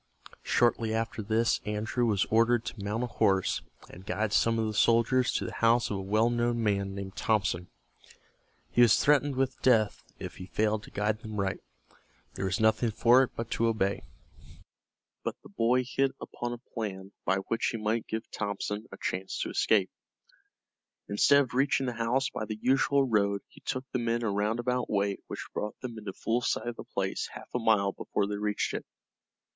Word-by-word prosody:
Shortly 115 -2 +2
after 115 0 -2
this 110 +2 +1
Andrew 110 +3 -1
was 105 -2 +2
ordered 115 +1 +3
to 105 - -6
mount 105 +4 -1
a - - +1
horse, 100 -5 +1 0.3
and 90 - -12
guide 105 +3 -1
some 115 0 +3
of 110 - +1
the 110 - -2
soldiers 115 +4 +3
to - - -1
the - - -5
house 115 0 +3
of 100 - -1
a - - -3
well 110 +5 +2
known 120 0 0
man 100 -2 0
named 100 -1 -6
Thompson. 95 -5 0 1.0
He 120 - +4
was 120 -3 +7
threatened 145 -1 +3
with 130 0 -1
death 110 -5 +3
if - - -7
he 90 - -8
failed 110 +1 0
to - - -13
guide 105 +1 -1
them 110 -3 -6
right. 95 0 -1 0.7
There - - -3
was 95 0 0
nothing 110 +2 +3
for 120 +4 +5
it 130 - -1
but 115 0 -5
to 115 - +1
obey, 100 -3 0 1.2
but - - -2
the - - -13
boy 120 +5 +2
hit 135 +1 0
upon 120 0 -5
a 120 - -4 0.2
plan 100 -4 -4
by 95 - +2
which 110 +4 -1
he 115 - -1
might 110 +1 -1
give 110 0 -3
Thompson 105 +1 -3
a 95 - -9
chance 95 +1 -3
to - - -2
escape. 100 -4 +2 1.2
Instead 140 +8 +5
of 125 - -9
reaching 135 +1 +2
the 125 - -2
house 120 +4 +1
by 110 - -4
the 110 0 -5
usual 135 +2 +3
road 100 -3 +1
he - - -18
took 130 0 -3
the 125 - -1
men 120 0 0
a 110 - 0
roundabout 120 +5 0
way 100 -1 0
which - - -6
brought 105 - -4
them 120 -3 -6
into 105 -2 -6
full 115 +5 -1
sight 120 - -1
of 120 - -6
the - - -7
place - - -2
half - - -10
a 125 - 0
mile 110 -4 +3
before 100 - -2
they 105 0 -3
reached 105 0 -1
it. - - -5
110 Hz, 195 wpm, -29 LUFS, 100-120 Hz, 1.2 s, was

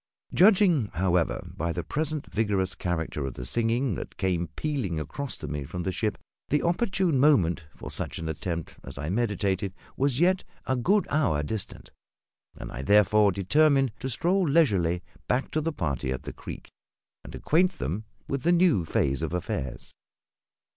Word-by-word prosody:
Judging, 185 - +5
however, 90 -1 0
by 85 +2 -1
the 85 0 -3
present 155 - -2
vigorous 100 -3 +1
character 80 -4 -2
of 65 -2 -4
the - - -6
singing 115 - +1
that - - -7
came 90 -2 0
pealing 130 - -2
across 130 - -5
to - - -7
me 75 -1 -3
from 90 +6 -5
the 95 - -1
ship, 105 +2 -1 0.3
the 150 - +2
opportune 175 - +1
moment 95 - +3
for - - -8
such - - -4
an 80 - -4
attempt 80 +2 -4
as - - -9
I 75 +4 -3
meditated 100 -3 0 0.2
was 135 -1 +1
yet 185 +2 +3 0.2
a 130 - +1
good 190 - +2
hour 105 - +2
distant, 105 +6 -5 0.7
and - - -7
I - - -5
therefore 105 +5 +5
determined 135 - +3
to 130 - -3
stroll 175 +7 +1
leisurely 95 - +3 0.2
back 125 +2 0
to 155 - 0
the 165 +2 -1
party 70 - -2
at 65 - -4
the - - -6
creek, - - -9 0.5
and - - -9
acquaint 180 +4 +2
them 85 +12 -4 0.2
with 135 -1 -2
the 170 - +3
new 170 - +4
phase 70 -2 0
of 80 +1 -2
affairs. 70 -7 -4
105 Hz, 170 wpm, -27 LUFS, -, 0.7 s, Judging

